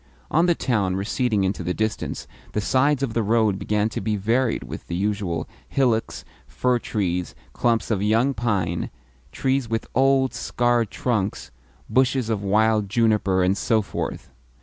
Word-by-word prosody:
On 165 +4 +3
the 175 - +3
town 105 -11 0
receding 105 +1 0
into 95 0 -1
the 90 +1 -2
distance, 110 0 -2 0.3
the - - 0
sides 135 +5 +2
of 125 -5 -1
the 115 - +1
road 110 -2 +2
began 105 0 0
to - - -4
be 110 -1 0
varied 115 +5 0
with - - -8
the 85 - -3
usual 95 -4 -1 0.2
hillocks, 120 -5 0 0.2
fir 125 - +1
trees, 90 -6 -2 0.2
clumps 115 -1 +1
of 100 -3 +1
young 115 +6 +2
pine, 100 -8 -1 0.4
trees 135 -3 0
with 115 -1 -1
old, 135 0 +3
scarred 120 0 +1
trunks, 105 -4 -2 0.4
bushes 130 -2 +2
of 105 -3 -1
wild 105 +1 +2
juniper, 105 -4 +2
and 95 +2 +2
so 110 -2 +2
forth. - - -5
110 Hz, 155 wpm, -23 LUFS, 100-120 Hz, 0.4 s, On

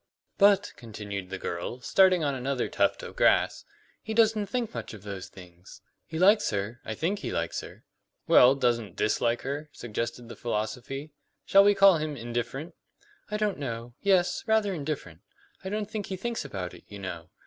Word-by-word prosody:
"But," 200 -1 +5
continued 100 -4 -6
the 95 - -4
girl, 90 +7 -4
starting 185 +2 +4
on 140 -1 +1
another 130 0 -1
tuft - - +1
of - - -8
grass, - - +3 0.4
"he 220 - -5
doesn't 220 -2 +3
think 240 -1 -2
much 115 -2 -6
about 100 - -13
those 100 -2 -6
things. 90 -1 -14 0.3
He 160 - -5
likes 200 +5 +5
her. 105 +3 -3
I 110 - -4
think 190 - -1
he - - -4
likes 85 0 -2
her - - -12 0.2
" - - -52
"Well, 125 +2 +7
doesn't 120 -7 0
dislike 115 +2 +1
her?" 145 +3 -4
suggested 115 +1 -4
the 115 - -9
philosopher. 120 +6 -3 0.4
"Shall 195 0 +7
we 205 0 +5
call 195 -3 +7
him 155 -2 -3
indifferent?" 120 +6 -4 0.6
"I 210 - -1
don't 210 -5 -1
know. 120 -3 -5
Yes, 180 -3 +2
rather 220 -3 +2
indifferent. 140 - -5 0.4
I 190 - -4
don't 210 +1 -2
think 215 -2 -5
he 190 - -3
thinks 235 +4 -3
about 90 -2 -5
it, 90 - -13
you 100 - -9
know. 90 -3 -7
130 Hz, 180 wpm, -28 LUFS, -, 0.6 s, Well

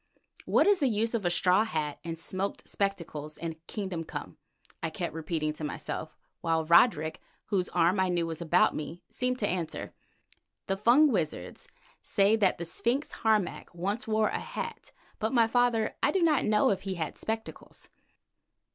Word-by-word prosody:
"What - - +4
is 405 -2 +4
the 280 - +3
use 225 0 0
of 220 -5 -1
a - - +4
straw 185 +3 +4
hat 155 -9 -3
and 165 0 -5
smoked 190 +4 -4
spectacles 165 -6 -3
in 165 -1 -5
kingdom 190 -6 -4
come?" - - -7 0.4
I - - -1
kept - - -4
repeating 155 -1 -2
to 155 - -9
myself, 155 +1 -5 0.2
while 165 -1 0
Roderick, 160 -2 +4 0.3
whose 190 -4 0
arm 175 +3 +2
I 190 -1 +2
knew 175 -1 +1
was 165 0 -5
about 170 +2 +4
me, 160 +3 -6
seemed 250 0 -1
to 205 - 0
answer: 175 -4 -3 0.7
"The 195 - 0
Fung 245 +9 +5
wizards 155 - -3 0.3
say 200 +2 +3
that 200 -4 +3
the 170 - -5
sphinx 240 - -1
Harmac 215 -6 0
once 200 +7 -2
wore 215 0 +2
a - - -2
hat, 460 -1 -6 0.3
but, 220 +3 -1
my 235 -2 +5
father, 230 -1 +2
I - - +3
do 380 -3 +2
not 305 -5 +3
know 210 -1 +4
if 195 - -1
he 195 -1 -3
had 160 -3 -4
spectacles." 220 0 -6
190 Hz, 175 wpm, -29 LUFS, 165-225 Hz, 0.7 s, Fung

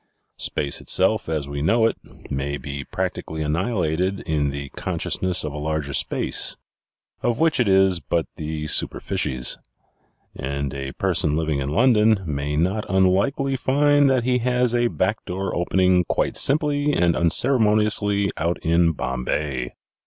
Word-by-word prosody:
Space 70 - -1
itself, 95 0 +2
as 75 -3 -2
we 70 0 -5
know 110 +9 +3
it, 115 - +1 0.4
may 70 +1 -2
be 70 -1 -6
practically 80 +4 -4
annihilated 90 +2 -1
in 75 -4 -1
the 70 0 -5
consciousness 95 +5 -1
of 75 -2 -4
a 75 - -5
larger 75 -2 -3
space, - - +1 0.6
of 120 -1 -1
which 160 -3 +2
it 120 - +2
is 95 -2 +4
but 85 -1 -1
the 75 0 -5
superficies; 65 -4 -1 0.8
and 70 +1 -4
a 70 -1 -5
person 75 -1 0
living 80 -3 -1
in 70 0 -3
London 110 - +3
may 75 -1 -3
not 95 +7 -1
un 95 0 +3
likely 135 +9 +1
find 145 +2 +3
that 130 -3 +2
he 125 0 +1
has 125 0 +1
a 120 0 +2
back 105 -1 -1
door 95 +1 -3
opening 90 +1 +2
quite - - -1
simply 145 0 +2
and 85 - +2
unceremoniously 105 - +2
out 85 +2 -1
in 85 0 +3
Bombay." 65 -1 -3
90 Hz, 145 wpm, -22 LUFS, 75-115 Hz, 0.8 s, is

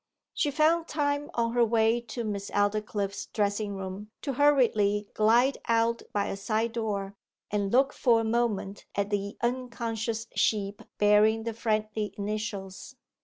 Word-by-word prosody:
She 295 - +1
found 320 +3 +2
time 290 -1 -1
on 230 -1 0
her 240 -1 +4
way 225 +1 +3
to 235 +2 -4
Miss 200 -2 -4
Aldclyffe's 205 -1 -1
dressing 205 -1 -1
room 195 +2 -6
to 275 - -2
hurriedly 220 -8 +3
glide 235 +5 +3
out 230 0 +2
by 205 -1 0
a - - -3
side 220 +3 -1
door, 205 -4 -3 0.4
and 200 -1 0
look 270 +3 +3
for 235 -3 +3
a - - 0
moment 220 -3 -1
at 200 +1 -1
the 200 0 -2
unconscious 235 -2 -2
sheep 205 -2 0 0.2
bearing 210 +2 +4
the 230 0 -3
friendly 215 -2 -2
initials. 205 +1 -5
220 Hz, 145 wpm, -28 LUFS, 205-235 Hz, 0.4 s, her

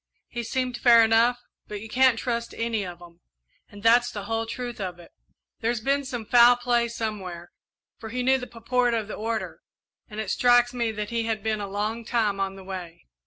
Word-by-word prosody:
"He 240 - -4
seemed 250 +1 -2
fair 235 -2 +7
enough, 230 +2 +4 0.3
but 210 - -6
you 220 - -9
can't 255 +1 +4
trust 235 0 -3
any 230 -2 -1
of 175 -1 -8
'em 170 0 -16 0.5
and 205 0 -13
that's 240 +1 +5
the 205 -4 -6
whole 225 +2 -2
truth 240 -1 -5
of 180 -2 -4
it. 175 - -15 0.5
There's 230 +1 0
been 275 +4 0
some 245 -4 -5
foul 240 +2 +7
play 240 -1 +1
somewhere, 195 -7 -5 0.5
for 220 - -8
he 250 +2 -2
knew 265 +1 +3
the 250 - -7
purport 240 +1 0
of 220 -3 -2
the - - -6
order, 225 +1 -4 0.5
and 215 0 -7
it 215 -3 -2
strikes 245 0 +4
me 235 -2 -1
that 210 0 -5
he 230 -1 -1
had 220 -2 -2
been 215 -1 -1
a 200 - -4
long 210 +4 -3
time 220 -4 0
on 195 0 -2
the 195 - -11
way." 185 - -8
225 Hz, 210 wpm, -25 LUFS, 210-245 Hz, 0.5 s, fair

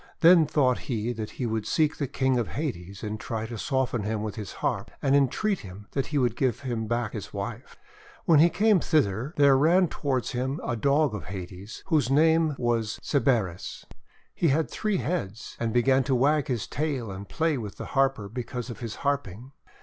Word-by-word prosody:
Then 170 -2 +7
thought 130 -4 +2
he 120 0 -1
that 110 -2 -7
lie 125 - 0
would 110 -2 -2
seek 155 -1 +1
the 140 - -2
King 130 -1 +1
of 120 - -1
Hades 100 - -5
and 105 0 -4
try 110 0 -4
to 115 +1 -6
soften 130 -1 -1
him 105 +1 -2
with 105 -2 -3
his 105 -3 -7
harp, - - -2
and 135 0 +2
entreat 170 - +2
him 95 +2 -10
that 135 - -1
he 150 - -2
would 120 -4 +2
give 125 -2 0
him 120 -5 -3
back 120 -1 -1
his 105 - -6
wife. 105 +5 -6 0.5
When 165 -7 +6
he 170 +3 +7
came 210 +1 +3
thither 135 - +1
there 140 -2 +6
ran 170 +6 +4
toward 130 -6 -1
him 130 +4 -2
a 120 - -1
Dog 140 +2 +2
of 105 - -5
Hades 95 +2 -8
whose 155 -8 +2
name 160 +1 +4
was 115 -3 -1
Cerberus. 115 - 0 0.5
He 170 - +1
had 155 +2 +1
three 215 -3 0
heads, 140 - -3
and 115 -1 -1
began 130 +3 +3
to 130 - +2
wag 145 +4 +2
his 120 -6 -1
tail 135 -6 -2
and 95 +1 -8
play 160 -4 0
with 105 -3 -6
the - - -6
Harper 135 -6 +2
because 120 +2 -5
of - - -9
his 115 -3 -5
harping. 130 -4 -2
125 Hz, 195 wpm, -27 LUFS, 110-145 Hz, 0.5 s, Then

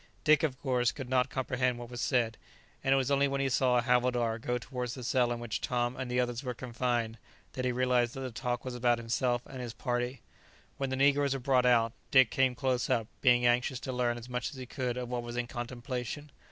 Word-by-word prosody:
Dick, 155 -1 +5
of 140 -4 -1
course, 125 -3 +1
could 135 -4 -7
not 130 +1 +3
comprehend 125 -2 0
what 120 0 -8
was 120 0 -5
said, 120 -4 +1 0.5
and 135 - +1
it - - +6
was 135 +1 0
only 140 0 +4
when 140 0 -1
he 135 0 +1
saw 130 -2 +3
a 120 - +2
havildar 120 -2 +2
go 125 +2 -1
towards 125 -1 -4
the 130 - -7
cell 120 0 +2
in 120 - -2
which 120 -2 -4
Tom 120 0 0
and 130 -2 -4
the 125 0 +1
others 120 +1 -1
were 125 -2 -3
confined, 120 -2 -2 0.3
that 130 - -3
he 125 - +2
realized 125 -1 +1
that 135 - -5
the 130 -1 -4
talk 120 +1 -3
was 130 - -4
about 120 -1 +2
himself 120 +1 0
and 130 - -8
his 120 -2 -6
party. 125 0 -2 0.6
When 135 -1 -2
the 130 - -1
negroes 140 0 +3
were - - -3
brought 125 -1 +3
out, 115 -2 +4 0.2
Dick 130 -4 +6
came 130 -1 +2
close 130 -2 0
up, 115 - +2 0.2
being 125 -2 +5
anxious 120 +1 +2
to 130 - -4
learn 120 -1 0
as 120 0 -9
much 125 -1 -2
as 145 - -11
he 130 -1 -7
could 125 -1 -3
of 125 -1 -3
what 125 0 -2
was 120 0 -6
in 120 - 0
contemplation. 125 +3 -5
125 Hz, 240 wpm, -31 LUFS, 120-130 Hz, 0.6 s, it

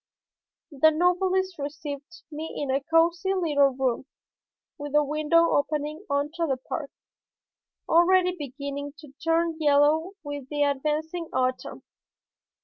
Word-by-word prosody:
The 295 +2 +5
novelist 360 +2 +1
received 290 +3 -7
me 310 +2 -6
in 280 -2 -2
a 270 +1 +1
cosy 335 +5 +2
little 295 -6 +3
room, 265 0 -1 0.7
with 290 0 -5
a 295 - +5
window 310 +3 +2
opening 300 +4 -1
onto 300 +4 -1
the 265 -3 0
park, 280 +3 -5 1.0
already 360 +2 +4
beginning 280 -1 -6
to 300 -3 -14
turn 330 0 +1
yellow 300 +4 +3
with 285 -3 -6
the 290 -1 0
advancing 305 +4 -1
autumn. 255 0 -2
300 Hz, 120 wpm, -26 LUFS, 285-335 Hz, 1.0 s, The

